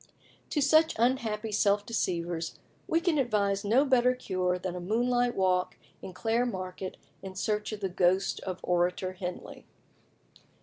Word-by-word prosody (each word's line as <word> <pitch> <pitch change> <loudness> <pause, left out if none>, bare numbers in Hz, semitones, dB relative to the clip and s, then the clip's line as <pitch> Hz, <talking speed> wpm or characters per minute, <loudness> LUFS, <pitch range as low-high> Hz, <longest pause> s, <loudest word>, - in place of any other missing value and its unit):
To 295 - 0
such 315 +3 +4
unhappy 225 -3 0
self 205 0 +2
deceivers 170 -6 -2 0.3
we 330 - +2
can 335 -3 +1
advise 205 -5 +1
no 235 +8 +3
better 250 -2 +3
cure 185 -7 -1
than 180 0 -4
a - - -4
moonlight 245 +6 +1
walk 185 -1 +1 0.2
in - - -7
Clare 225 +6 0
Market 185 -3 -5 0.2
in 190 -1 -8
search 210 +2 -1
of 210 -1 -6
the 195 - 0
ghost 185 +2 +1
of 185 -1 -5
Orator 180 +1 0
Henley. 180 -1 -7
200 Hz, 145 wpm, -29 LUFS, 185-240 Hz, 0.3 s, such